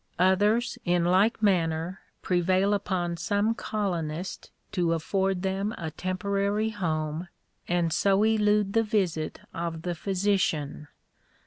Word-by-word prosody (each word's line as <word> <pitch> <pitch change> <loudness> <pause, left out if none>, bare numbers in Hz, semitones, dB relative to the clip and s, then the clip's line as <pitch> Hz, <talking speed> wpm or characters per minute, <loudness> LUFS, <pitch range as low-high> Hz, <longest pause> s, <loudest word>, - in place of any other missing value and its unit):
Others 205 +7 +2
in 175 -1 +2
like 200 +6 +3
manner 170 -2 +1 0.2
prevail 185 +3 +2
upon 180 -4 -1
some 205 +6 +1
colonist 180 -6 -3 0.2
to 175 -3 +1
afford 190 +3 0
them 195 +2 -1
a 160 -3 -4
temporary 200 +4 -1
home, 160 -4 -2 0.4
and 170 -2 +1
so 200 +1 +3
elude 210 -2 +2
the 225 - +4
visit 190 -8 -1
of 165 -1 -4
the 175 - -1
physician. 180 -6 -1
185 Hz, 115 wpm, -27 LUFS, 170-205 Hz, 0.4 s, the